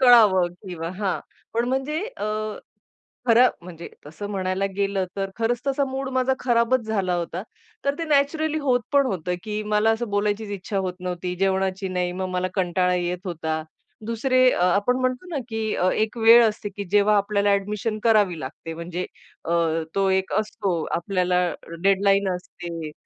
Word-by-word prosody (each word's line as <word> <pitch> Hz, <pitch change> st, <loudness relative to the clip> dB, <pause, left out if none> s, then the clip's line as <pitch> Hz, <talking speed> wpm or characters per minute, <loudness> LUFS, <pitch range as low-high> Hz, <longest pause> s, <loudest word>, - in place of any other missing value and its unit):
कळावं 220 Hz, -8 st, +7 dB, 0.2 s
किंवा 165 Hz, -2 st, -4 dB
हां, 200 Hz, -3 st, 0 dB, 0.4 s
पण 235 Hz, +1 st, +2 dB
म्हणजे 270 Hz, +5 st, -1 dB, 0.2 s
अ, -, -, -4 dB, 1.0 s
खरं 240 Hz, +2 st, +6 dB
म्हणजे 170 Hz, -1 st, -9 dB, 0.2 s
तसं 165 Hz, +7 st, -7 dB
म्हणायला 190 Hz, 0 st, -1 dB
गेलं 200 Hz, -1 st, 0 dB
तर 195 Hz, -1 st, -2 dB
खरंच 230 Hz, +1 st, 0 dB
तसा 275 Hz, +1 st, +1 dB
मूड 270 Hz, 0 st, -3 dB
माझा 260 Hz, 0 st, +2 dB
खराबच 240 Hz, +1 st, +2 dB
झाला 195 Hz, -5 st, 0 dB
होता. 175 Hz, +1 st, -3 dB, 0.4 s
तर 280 Hz, 0 st, +1 dB
ते 335 Hz, -, -2 dB
नॅचरली 310 Hz, +1 st, +1 dB
होत 260 Hz, -4 st, +2 dB
पण 280 Hz, -1 st, +4 dB
होतं 180 Hz, -4 st, -2 dB
की 215 Hz, -1 st, -3 dB
मला 210 Hz, +1 st, +2 dB
असं 225 Hz, +1 st, -1 dB
बोलायचीच 205 Hz, +1 st, 0 dB
इच्छा 195 Hz, +1 st, -3 dB
होत 185 Hz, -1 st, -2 dB
नव्हती, 180 Hz, 0 st, -3 dB
जेवणाची 190 Hz, 0 st, 0 dB
नाही, 180 Hz, -1 st, -1 dB
मग 185 Hz, +1 st, -3 dB
मला 180 Hz, 0 st, -1 dB
कंटाळा 180 Hz, -1 st, +1 dB
येत 180 Hz, 0 st, -1 dB
होता. 160 Hz, -3 st, -3 dB, 0.4 s
दुसरे 255 Hz, +3 st, +1 dB
अ, -, -, -1 dB
आपण 200 Hz, +7 st, +2 dB
म्हणतो 255 Hz, +6 st, -1 dB
ना -, -, 0 dB
की 220 Hz, -1 st, -2 dB
अ, 180 Hz, -, +2 dB
एक 220 Hz, +2 st, -1 dB
वेळ 230 Hz, +1 st, +8 dB
असते 210 Hz, -1 st, -5 dB
की 200 Hz, -, -3 dB
जेव्हा 205 Hz, +1 st, +4 dB
आपल्याला 205 Hz, 0 st, +2 dB
अ‍ॅडमिशन 210 Hz, +2 st, -1 dB
करावी 210 Hz, -7 st, +3 dB
लागते 160 Hz, +5 st, -7 dB
म्हणजे 175 Hz, +2 st, -4 dB, 0.4 s
अ, -, -, -4 dB, 0.4 s
तो 195 Hz, -1 st, +2 dB
एक 190 Hz, 0 st, 0 dB
असतो 210 Hz, -2 st, -2 dB, 0.2 s
आपल्याला 180 Hz, 0 st, 0 dB, 0.4 s
डेडलाईन 195 Hz, 0 st, +3 dB
असते 170 Hz, -3 st, -7 dB
200 Hz, 165 wpm, -24 LUFS, 180-230 Hz, 1.0 s, वेळ